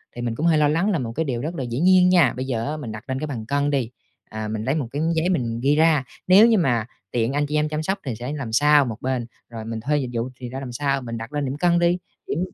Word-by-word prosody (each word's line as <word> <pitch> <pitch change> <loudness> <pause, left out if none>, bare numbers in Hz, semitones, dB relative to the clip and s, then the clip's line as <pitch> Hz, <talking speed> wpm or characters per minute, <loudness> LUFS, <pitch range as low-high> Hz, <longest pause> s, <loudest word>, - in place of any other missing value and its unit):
thì 120 - -5
mình 120 -1 -2
cũng 155 - -2
hơi 165 -2 +4
lo 150 -1 +4
lắng 165 +7 +1
là 175 - 0
một 120 -3 -4
cái 160 - 0
điều 125 -6 -3
rất 160 +6 -4
là 135 - -3
dĩ 120 0 -3
nhiên 180 +1 +5
nha. 175 -9 +4
Bây 130 +2 -4
giờ 115 -3 -2
á 150 +2 -3
mình 130 -7 -6
đặt 110 +1 -8
lên 130 0 -2
cái 155 - -3
bàn 120 -7 -5
cân 140 +3 0
đi, 135 -5 0 0.4
ờ, 110 0 -5
mình 110 0 -3
lấy 135 +5 0
một 145 -6 -2
cái 145 - -3
giấy 160 +3 +1
mình 120 -10 -1
ghi 140 +2 +4
ra. 155 -3 +4 0.2
Nếu 195 +5 +8
như 230 -2 +4
mà 120 - +1 0.3
tiện 120 +2 0
anh 145 +1 +1
chị 150 +1 -3
em 150 0 +1
chăm 155 0 -2
sóc 195 +5 -1
thì 130 -4 -3
sẽ 125 +5 -5
làm 140 -7 -5
sao 145 +4 +5
một 115 -4 -5
bên, 130 -2 -1 0.2
rồi 115 -2 -7
mình 115 0 -4
thuê 145 +6 0
dịch 130 -4 -2
vụ 115 +2 -2
thì 125 -1 -6
ra 130 +2 -5
làm 135 -2 -6
sao, 135 +2 -1
mình 115 -2 -5
đặt 115 +5 -8
lên 145 -1 -1
điểm 135 +2 -3
cân 175 +2 +3
đi, 175 +1 +3 0.3
điểm 150 - -2
140 Hz, 310 wpm, -23 LUFS, 120-155 Hz, 0.4 s, Nếu